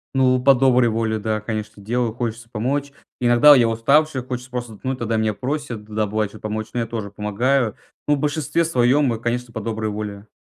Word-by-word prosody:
Ну, 130 -1 +4
по 140 0 +7
доброй 125 -2 +4
воле, 110 0 -1
да, 110 0 -2
конечно, 105 -1 -5
делаю. 120 +1 -1
Хочется 115 -1 -4
помочь. 140 +6 -2 0.3
Иногда 120 +4 +7
я 120 -3 +4
уставший, 135 +5 +2
хочется 125 0 -6
просто 120 -2 -5
отдохнуть, 130 +5 -4
тогда 115 -1 -1
меня 110 -1 +1
просят, 130 -4 -4
да, 110 0 -1
бывает, 105 0 -1
что 110 - -13
помочь, 110 +1 -4
ну 120 - -1
я - - -1
тоже 110 -3 -5
помогаю. 110 +4 0 0.3
Ну, 150 - +4
в - - -5
большинстве 150 +3 0
своем, 135 -3 +2
м, 115 - -3
конечно, 120 +1 -2
по 110 - -4
доброй 110 0 -3
воле. 105 0 -6
120 Hz, 200 wpm, -21 LUFS, 110-130 Hz, 0.3 s, по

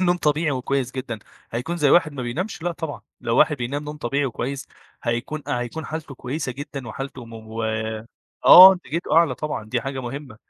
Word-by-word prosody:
نوم 175 -1 +3
طبيعي 155 -1 +1
وكويس 130 -1 -1
جدًا، 125 -4 -5 0.3
هيكون 125 +9 -3
زي 150 -4 +3
واحد 160 -4 +4
ما 130 - -5
بينامش؟ 170 - -4
لأ 175 - -1
طبعًا. 160 -3 -6 0.2
لو 115 - -1
واحد 150 - +4
بينام 140 +4 -3
نوم 150 0 -6
طبيعي 140 +1 -1
وكويس، 135 +2 -4 0.3
هيكون 120 +6 -2
هيكون 125 +6 -3
حالتُه 155 -3 -6
كويسة 130 +2 -4
جدًا 140 -1 -7
وحالته 135 +1 -7
مو 115 0 -7 0.8
آه، 185 +1 +12
انتاجيته 170 -3 -3
أعلى 165 -6 +5
طبعًا 150 -5 -4
دي 115 +3 -2
حاجة 135 +2 -4
مهمة. 130 -1 -7
140 Hz, 175 wpm, -23 LUFS, 120-155 Hz, 0.8 s, آه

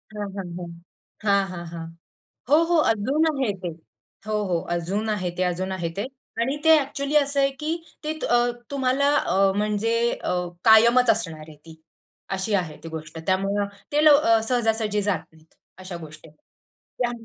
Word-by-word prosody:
हं, 205 -1 -4
हं, 180 -3 -5
हं. 175 -1 -7 0.5
हां, 200 -1 +3
हां, 175 -1 -7
हां. 165 -1 -6 0.6
हो, 300 - +6
हो. 345 - +4
अजून 270 +9 +1
आहे 265 -7 0
ते. 175 - -2 0.6
हो, 215 - -1 0.2
हो. 170 - +2 0.2
अजून 200 +6 -2
आहे 185 -3 -2
ते, - - +3
अजून 180 +1 -1
आहे 170 -3 -2
ते. 205 - -1 0.4
आणि 265 +4 0
ते 320 0 +7
ॲक्चुअली 280 +1 -3
असं 285 -1 +3
आहे 275 0 +4
की 310 - -1 0.3
ते 310 +1 -2
अ, 240 - +4 0.3
तुम्हाला 275 +1 +1
अ, 195 0 +2
म्हणजे 210 +2 0 0.2
अ, - - -3 0.3
कायमच 235 +2 +6
असणार 165 -8 0
आहे 155 - -12
ती, 160 -1 -12 0.6
अशी 205 +3 -2
आहे 155 -3 -8
ती 165 - -7
गोष्ट. 160 0 -7
त्यामुळे 195 +2 +1 0.3
ते 300 +1 +2
लव 295 -1 +7 0.3
सहजा-सहजी 225 -4 +1
जात 200 -1 -1
नाहीत, 160 0 -23 0.3
अशा 185 -2 -7
गोष्टी. 155 +1 -13 0.5
त्या 245 -1 -4
205 Hz, 165 wpm, -24 LUFS, 180-255 Hz, 0.6 s, ते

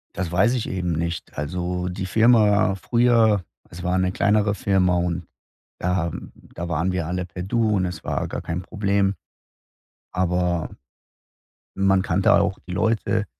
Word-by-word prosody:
Das 90 -2 -3
weiß 110 +8 +3
ich 115 - -2
eben 90 -2 -2
nicht, 85 -1 -4
also, 90 +4 -3
die 95 +1 -4
Firma 105 -1 +4
früher 115 -2 +3 0.3
es 85 +2 -9
war 90 +1 +1
'ne 95 0 +1
kleinere 105 +1 +2
Firma 95 -3 +2
und 85 -1 -1 0.5
da 85 -2 0 0.4
da 85 - -5
waren 85 +3 0
wir 90 -4 -2
alle 90 +1 -2
per 90 0 -7
Du 115 +2 +1
und 95 - +1
es 90 - -6
war - - -2
gar - - -5
kein 85 +2 -4
Problem, 100 0 0 1.0
aber 90 -2 0 1.1
man 95 -1 +3
kannte 95 0 +2
auch - - +2
die 90 - -6
Leute. 110 +3 0
95 Hz, 150 wpm, -23 LUFS, 90-100 Hz, 1.1 s, Firma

